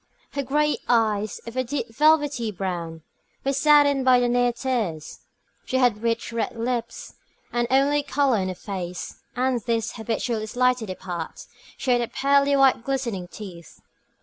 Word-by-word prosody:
Her 280 - -2
great 295 +3 +1
eyes, 215 -3 +1
of 230 +1 -8
a 255 - +1
deep 240 -3 -4
velvety 290 -5 +3
brown, 170 -4 -4 0.4
were 275 - +1
saddened 285 -1 +4
by 255 -1 +5
near 245 0 +2
tears. 230 - -3 0.4
She 260 - -1
had 245 -5 +2
rich 230 0 -1
red 230 - -2
lips, 235 0 -3 0.4
the 240 0 0
only 280 +2 +3
colour 275 -5 +1
in 185 - -1
her 185 - -4
face, 180 -2 -6
and 250 -1 +1
these, 230 0 -1
habitually 225 -1 -2
slightly 250 -2 +1
apart, 175 -3 -6 0.3
showed 245 -3 0
pearly 280 +1 +3
white 270 -4 +4
glistening 235 -9 -2
teeth. 180 -4 -11
240 Hz, 145 wpm, -24 LUFS, 215-270 Hz, 0.4 s, by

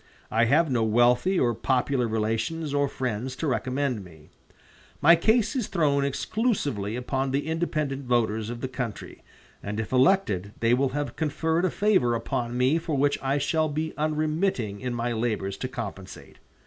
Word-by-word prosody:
I 115 +1 +3
have 150 +5 +3
no 120 -3 +2
wealthy 120 - +3
or 120 -2 +2
popular 125 +1 0
relations 115 +8 -2
or 145 0 +2
friends 125 -1 -3
to 160 - -4
recommend 130 -4 -1
me. 80 -4 -16 0.7
My 170 +3 +7
case 220 +6 +2
is 245 -6 -1
thrown 145 -6 +1
exclusively 140 - -1
upon 130 +2 -2
the 140 +2 -1
independent 155 -4 -2
voters 110 -3 0
of 120 0 -6
the 130 - -2
country, 125 -4 -6 0.4
and 105 +2 -4
if 110 - -4
elected 130 - +2
they 115 +1 +3
will 135 +2 +2
have 145 +2 -3
conferred 160 +2 0
a - - +2
favor 185 - +2
upon 120 +1 -3
me 130 +6 +3
for 160 -3 -2
which 145 +1 +2
I 135 +1 0
shall 155 +2 +1
be 155 +2 -3
unremitting 155 - -1
in 125 -1 -3
my 120 0 -1
labors 110 -4 -2
to 130 - -3
compensate. 105 -7 -8
130 Hz, 165 wpm, -26 LUFS, 115-155 Hz, 0.7 s, My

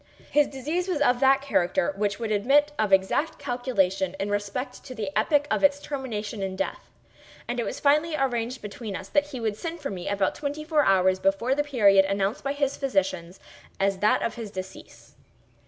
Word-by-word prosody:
His 295 0 +4
disease 305 +7 -3
was 360 -6 -1
of 245 -4 +3
that 270 +1 +4
character 180 -8 +1
which 200 0 -1
would 225 -2 -3
admit 275 +8 +3
of 215 -2 +1
exact 195 +11 +2
calculation 195 -9 -1
in 200 +1 -2
respect 205 +6 -3
to 255 - -8
the 210 -4 -4
epoch 290 +7 +2
of - - +1
its 285 0 +4
termination 230 -8 -5
in 190 -1 -3
death; 195 0 -4 0.6
and 240 +1 -2
it 235 - -1
was - - -4
finally 305 +3 +3
arranged 250 -3 -2
between 210 0 -6
us 190 +1 -7
that 290 0 +2
he 270 -4 -7
would 220 -3 -1
send 335 +4 -5
for 280 -6 -4
me 180 -2 -5
about 200 -1 +1
twenty 290 +1 -4
four 305 -1 +2
hours 185 -3 +3
before 195 +7 +1
the 290 +2 +1
period 205 -9 +4
announced 195 +1 -1
by 275 - -1
his 280 -1 -1
physicians 190 -8 -1 0.4
as 195 -1 +1
that 210 +2 +3
of 230 - -1
his 230 -3 -7
decease. 190 -1 -10
230 Hz, 195 wpm, -26 LUFS, 195-280 Hz, 0.6 s, His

